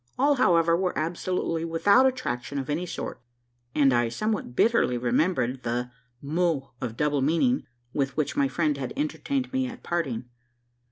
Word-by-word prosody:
All, 285 Hz, +3 st, +4 dB
however, 170 Hz, -7 st, +4 dB
were 180 Hz, +1 st, -1 dB
absolutely 165 Hz, 0 st, -1 dB
without 200 Hz, +10 st, +4 dB
attraction 145 Hz, -, -3 dB
of 135 Hz, +1 st, -3 dB
any 170 Hz, +5 st, -2 dB
sort; -, -, -5 dB, 0.5 s
and 140 Hz, -3 st, +4 dB
I 120 Hz, -1 st, +2 dB
somewhat 210 Hz, -, -2 dB
bitterly 225 Hz, -, +3 dB
remembered 125 Hz, +1 st, +1 dB
the 120 Hz, +1 st, -2 dB, 0.3 s
mot 155 Hz, -3 st, 0 dB
of 115 Hz, -2 st, -4 dB
double 150 Hz, -2 st, +1 dB
meaning, 170 Hz, -, +2 dB, 0.3 s
with 135 Hz, -1 st, -1 dB
which 150 Hz, -2 st, 0 dB
my 140 Hz, -, +3 dB
friend 150 Hz, +1 st, 0 dB
had 130 Hz, -2 st, -4 dB
entertained 275 Hz, -3 st, -2 dB
me 260 Hz, 0 st, +1 dB
at 250 Hz, 0 st, -9 dB
parting. 140 Hz, -10 st, -2 dB
160 Hz, 155 wpm, -26 LUFS, 130-190 Hz, 0.5 s, All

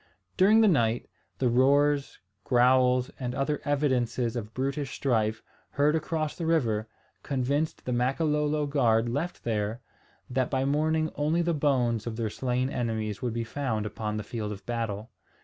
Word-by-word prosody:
During 210 Hz, +4 st, +5 dB
the 220 Hz, -, +6 dB
night, 120 Hz, -, +2 dB, 0.3 s
the 130 Hz, -, +1 dB
roars, 140 Hz, +3 st, +3 dB, 0.3 s
growls, 125 Hz, +1 st, +3 dB
and 125 Hz, -1 st, -3 dB
other 140 Hz, +2 st, -1 dB
evidences 130 Hz, -5 st, 0 dB
of 110 Hz, -2 st, -4 dB
brutish 135 Hz, +3 st, -3 dB
strife, 115 Hz, -4 st, 0 dB, 0.3 s
heard 145 Hz, +2 st, +2 dB
across 155 Hz, -1 st, -2 dB
the 165 Hz, -, -3 dB
river, 115 Hz, -10 st, +1 dB, 0.3 s
convinced 140 Hz, +3 st, -1 dB
the 125 Hz, -, -1 dB
Makololo 150 Hz, +4 st, +1 dB
guard 120 Hz, -6 st, +2 dB
left 145 Hz, +9 st, -3 dB
there, 110 Hz, 0 st, -1 dB, 0.5 s
that 130 Hz, -1 st, 0 dB
by 135 Hz, -1 st, 0 dB
morning 155 Hz, +2 st, +1 dB
only 155 Hz, +4 st, +1 dB
the 170 Hz, 0 st, +1 dB
bones 125 Hz, -7 st, +1 dB
of 115 Hz, -, -3 dB
their 110 Hz, -2 st, -2 dB
slain 125 Hz, +1 st, -1 dB
enemies 110 Hz, -4 st, -2 dB
would 120 Hz, -3 st, -2 dB
be 115 Hz, -, -1 dB
found 115 Hz, -3 st, -2 dB
upon 105 Hz, 0 st, -3 dB
the 105 Hz, -, -3 dB
field 110 Hz, -1 st, -4 dB
of 100 Hz, -1 st, -8 dB
battle. 115 Hz, -2 st, -3 dB
130 Hz, 155 wpm, -28 LUFS, 115-145 Hz, 0.5 s, the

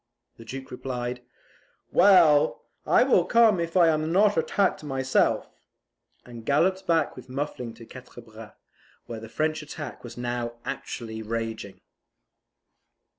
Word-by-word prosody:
The 115 Hz, -, -13 dB
Duke 130 Hz, +3 st, -8 dB
replied, 125 Hz, -1 st, -5 dB, 0.7 s
"Well, 175 Hz, -6 st, +5 dB, 0.2 s
I -, -, +5 dB
will -, -, +4 dB
come 230 Hz, -5 st, +4 dB
if 170 Hz, +1 st, -2 dB
I 175 Hz, -2 st, +6 dB
am 155 Hz, 0 st, 0 dB
not 205 Hz, +3 st, +4 dB
attacked 185 Hz, +2 st, 0 dB
myself," 135 Hz, -2 st, 0 dB, 0.8 s
and 120 Hz, -2 st, -10 dB
galloped 185 Hz, +9 st, +1 dB
back 165 Hz, -3 st, +1 dB
with 125 Hz, 0 st, -12 dB
Muffling 130 Hz, -3 st, -5 dB
to 115 Hz, -, -13 dB
Quatre 125 Hz, 0 st, -12 dB
Bras, 110 Hz, -1 st, -13 dB, 0.5 s
where 115 Hz, -2 st, -7 dB
the 110 Hz, 0 st, -10 dB
French 155 Hz, +5 st, -1 dB
attack 150 Hz, 0 st, -8 dB
was 120 Hz, 0 st, -10 dB
now 120 Hz, -1 st, -3 dB
actually 110 Hz, -2 st, -6 dB
raging. 110 Hz, -2 st, -5 dB
130 Hz, 130 wpm, -26 LUFS, 120-165 Hz, 0.8 s, I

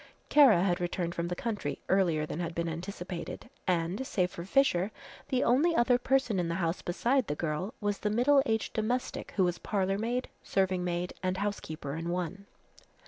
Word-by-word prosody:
Kara 255 Hz, -12 st, +7 dB
had 180 Hz, -1 st, +1 dB
returned 175 Hz, -1 st, -2 dB
from 170 Hz, 0 st, -2 dB
the 180 Hz, -, -2 dB
country 220 Hz, +1 st, -3 dB
earlier 170 Hz, -5 st, +2 dB
than 155 Hz, -, -5 dB
had 170 Hz, -1 st, -3 dB
been 170 Hz, 0 st, -1 dB
anticipated, 180 Hz, +4 st, -6 dB, 0.2 s
and, 180 Hz, +7 st, 0 dB
save 180 Hz, -2 st, 0 dB
for 170 Hz, -, -7 dB
Fisher, 195 Hz, -3 st, +2 dB, 0.4 s
the 260 Hz, 0 st, +2 dB
only 295 Hz, +8 st, +3 dB
other 245 Hz, -1 st, +4 dB
person 250 Hz, -6 st, +1 dB
in 175 Hz, -, 0 dB
the 170 Hz, -, -1 dB
house 170 Hz, -1 st, -1 dB
beside 240 Hz, +8 st, +1 dB
the 145 Hz, -, -1 dB
girl, 165 Hz, +6 st, -3 dB
was 205 Hz, -1 st, -1 dB
the 210 Hz, -, 0 dB
middle 255 Hz, +6 st, +4 dB
aged 220 Hz, -1 st, 0 dB
domestic 240 Hz, +4 st, -2 dB
who 190 Hz, -, +3 dB
was 175 Hz, -1 st, 0 dB
parlour 195 Hz, -1 st, 0 dB
maid, 240 Hz, +3 st, -1 dB
serving 190 Hz, -2 st, 0 dB
maid 175 Hz, 0 st, -2 dB
and 185 Hz, 0 st, -1 dB
housekeeper 160 Hz, -8 st, -3 dB
in 165 Hz, +1 st, -4 dB
one. 180 Hz, +3 st, -3 dB
190 Hz, 185 wpm, -30 LUFS, 175-225 Hz, 0.4 s, Kara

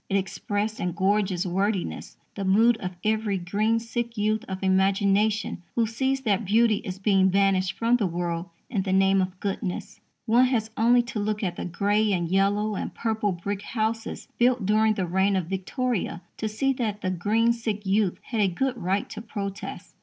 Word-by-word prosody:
It 200 Hz, -, +2 dB
expressed 205 Hz, +2 st, -2 dB
in 180 Hz, -1 st, -1 dB
gorgeous 190 Hz, 0 st, +1 dB
wordiness 195 Hz, +2 st, -2 dB, 0.2 s
the 200 Hz, -, -4 dB
mood 220 Hz, +5 st, +4 dB
of 185 Hz, -3 st, -5 dB
every 215 Hz, -2 st, +1 dB
green 205 Hz, +5 st, 0 dB
sick 235 Hz, 0 st, -4 dB
youth 215 Hz, +1 st, +1 dB
of 190 Hz, 0 st, -5 dB
imagination 195 Hz, +2 st, +2 dB
who 235 Hz, -, +3 dB
sees 265 Hz, +4 st, -1 dB
that 220 Hz, -3 st, +1 dB
beauty 215 Hz, +2 st, +3 dB
is 185 Hz, -1 st, -6 dB
being 195 Hz, -1 st, +3 dB
banished 190 Hz, -1 st, +2 dB
from 235 Hz, +2 st, +2 dB
the 210 Hz, -5 st, 0 dB
world 170 Hz, 0 st, -3 dB, 0.2 s
in 210 Hz, -5 st, -1 dB
the 190 Hz, 0 st, -1 dB
name 195 Hz, 0 st, +4 dB
of 185 Hz, 0 st, -4 dB
goodness. 195 Hz, 0 st, -4 dB, 0.3 s
One 240 Hz, +3 st, +5 dB
has 225 Hz, -4 st, 0 dB
only 240 Hz, +2 st, +4 dB
to 235 Hz, -2 st, -5 dB
look 210 Hz, +1 st, -2 dB
at 180 Hz, -3 st, -1 dB
the -, -, -5 dB
grey 205 Hz, +4 st, +1 dB
and 175 Hz, -2 st, 0 dB
yellow 200 Hz, +4 st, +1 dB
and -, -, -3 dB
purple 220 Hz, -3 st, 0 dB
brick 195 Hz, +3 st, -4 dB
houses 225 Hz, +1 st, -3 dB
built 245 Hz, -3 st, +3 dB
during 215 Hz, +1 st, +3 dB
the 190 Hz, -, -1 dB
reign 190 Hz, +3 st, +2 dB
of 185 Hz, -3 st, 0 dB
Victoria 195 Hz, -, -2 dB
to 220 Hz, -, -2 dB
see 270 Hz, +6 st, 0 dB
that 215 Hz, -5 st, -3 dB
the 185 Hz, -, -1 dB
green 220 Hz, +6 st, +2 dB
sick 220 Hz, -3 st, -4 dB
youth 195 Hz, -1 st, +1 dB
had 225 Hz, -4 st, -2 dB
a 200 Hz, -, +4 dB
good 255 Hz, +8 st, -1 dB
right 190 Hz, +3 st, 0 dB
to -, -, -6 dB
protest. 200 Hz, -3 st, -6 dB
205 Hz, 185 wpm, -26 LUFS, 190-220 Hz, 0.3 s, One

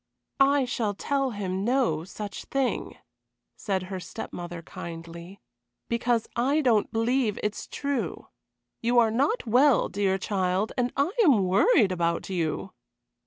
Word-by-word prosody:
"I 275 Hz, 0 st, +4 dB
shall 220 Hz, -4 st, -2 dB
tell 275 Hz, +5 st, 0 dB
him 195 Hz, -4 st, -3 dB
no 235 Hz, -, +1 dB
such 205 Hz, +1 st, -7 dB
thing," 270 Hz, -2 st, -2 dB, 0.6 s
said 190 Hz, -3 st, -2 dB
her 185 Hz, 0 st, -5 dB
step 180 Hz, -, -8 dB
mother, 175 Hz, -1 st, -6 dB
kindly, 170 Hz, +3 st, -9 dB, 0.5 s
"because 235 Hz, -1 st, +1 dB
I 275 Hz, +6 st, +2 dB
don't 230 Hz, -7 st, +2 dB
believe 225 Hz, -1 st, +1 dB
it 210 Hz, -, 0 dB
is -, -, -8 dB
true. 280 Hz, -3 st, -3 dB, 0.6 s
You 240 Hz, +1 st, +1 dB
are 230 Hz, -2 st, +5 dB
not 280 Hz, -, +1 dB
well, 250 Hz, +2 st, +4 dB
dear 195 Hz, -1 st, 0 dB
child, 190 Hz, +1 st, -1 dB
and 245 Hz, -1 st, 0 dB
I 285 Hz, +6 st, +2 dB
am 260 Hz, -, +5 dB
worried 200 Hz, -, +4 dB
about 170 Hz, -1 st, -1 dB
you." 175 Hz, +1 st, -2 dB
215 Hz, 140 wpm, -27 LUFS, 185-255 Hz, 0.6 s, are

